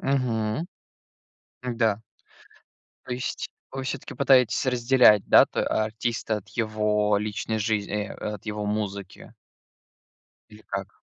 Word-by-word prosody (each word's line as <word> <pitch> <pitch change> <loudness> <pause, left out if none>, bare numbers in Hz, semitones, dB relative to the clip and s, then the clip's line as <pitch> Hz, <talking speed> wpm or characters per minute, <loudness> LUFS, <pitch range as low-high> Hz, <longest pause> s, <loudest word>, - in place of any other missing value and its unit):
Мгм. 125 +1 0 1.1
Да. 110 -2 +1 1.0
То 125 - -4
есть 125 +1 -3 0.2
вы 135 - -4
всё-таки 135 0 -5
пытаетесь 130 -3 +4
разделять, 125 -4 +5
да - - +7
то - - -3
э, - - +1
артиста 110 0 -1
от 105 +1 -9
его 105 -2 +1
личной 110 +1 -3
жизн 105 -1 -1
э, 105 0 -2 0.3
от 105 - -12
его 105 -1 -3
музыки? 100 -2 -4 1.2
Или 105 0 -15
как? 100 +1 -4
110 Hz, 120 wpm, -26 LUFS, 105-120 Hz, 1.2 s, да